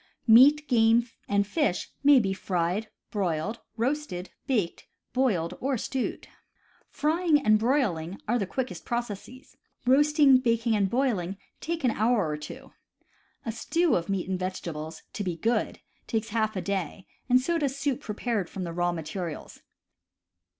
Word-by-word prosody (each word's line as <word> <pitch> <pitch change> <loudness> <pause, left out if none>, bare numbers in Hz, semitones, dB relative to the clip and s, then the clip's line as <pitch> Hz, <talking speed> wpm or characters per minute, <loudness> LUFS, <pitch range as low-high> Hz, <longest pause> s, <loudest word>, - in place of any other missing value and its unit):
Meat, 280 +6 +7
game, 230 -1 +4 0.2
and 200 0 +2
fish 210 - -1
may 285 -1 +7
be 195 -4 0
fried, 185 +3 -1 0.2
broiled, 195 +2 -1 0.2
roasted, 235 -7 -2 0.2
baked, 215 -10 -1 0.3
boiled, 210 -11 +1
or 270 0 0
stewed. 260 +3 -3 0.6
Frying 315 0 +2
and 215 0 +5
broiling 205 - 0
are 240 +3 +2
the 200 - -1
quickest 260 +5 -4
processes; 240 +3 -5 0.3
roasting, 285 0 +5
baking, 230 -2 +1
and 200 -2 +2
boiling 200 -7 0 0.2
take 330 -1 -3
an 250 - +3
hour 220 -4 +2
or 150 - -2
two; 150 - -10 0.7
a 230 - -1
stew 335 +8 +1
of 170 +2 -2
meat 195 -3 -1
and 185 -1 -2
vegetables, 165 -4 -5
to 205 - -3
be 180 -3 -2
good, 230 +6 0 0.3
takes 220 0 -2
half 220 -1 0
a 185 - -1
day, 190 -1 -3 0.2
and 250 +1 +6
so 335 +6 0
does 280 -2 -1
soup 280 -3 -1
prepared 210 -3 -2
from 190 - -5
the 170 -1 -4
raw 175 +1 +1
materials. 165 0 -6
220 Hz, 150 wpm, -27 LUFS, 185-260 Hz, 0.7 s, Meat